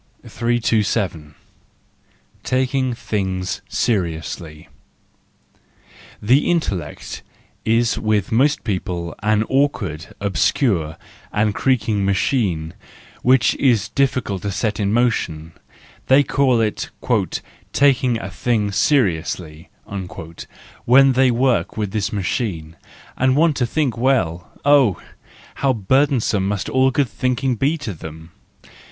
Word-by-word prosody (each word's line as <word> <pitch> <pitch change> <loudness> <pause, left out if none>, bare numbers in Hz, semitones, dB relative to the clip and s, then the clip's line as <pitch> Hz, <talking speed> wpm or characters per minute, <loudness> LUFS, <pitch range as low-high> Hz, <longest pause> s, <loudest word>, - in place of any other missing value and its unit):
327. 110 -9 -1 1.1
Taking 130 -1 0
Things 95 -5 -3
Seriously 85 -6 -2 1.5
.—The 125 +8 +3
intellect 100 - -2 0.4
is 115 +1 +1
with 105 -3 0
most 135 +6 +2
people 90 -4 -3
an 105 +1 +2
awkward, 110 - -1
obscure 90 - 0 0.3
and 105 0 +1
creaking 110 -6 +1
machine, 95 - 0 0.5
which 130 0 +4
is 115 -6 +2
difficult 130 -8 0
to 100 - -3
set 105 +2 -2
in 100 -1 0
motion: 90 -9 0 0.6
they 135 +2 +6
call 135 -4 +2
it 110 -2 -1 0.4
" - - -9
taking 130 -4 +3
a 95 - -6
thing 105 -1 0
seriously 90 - 0 0.5
" 80 +1 -15
when 135 +2 +6
they 130 0 +4
work 125 0 +1
with 105 -3 -2
this 105 -1 -1
machine, 95 -5 -3 0.4
and 130 0 +2
want 160 0 +3
to 125 - +1
think 140 -2 0
well—oh, 120 - +2 0.6
how 135 -1 +3
burdensome 115 -3 +1
must 100 -2 -2 0.2
good 135 0 +1
thinking 130 +2 -1
be 140 +8 0
to 140 -9 -5
them 80 0 -10
110 Hz, 105 wpm, -20 LUFS, 95-130 Hz, 1.5 s, they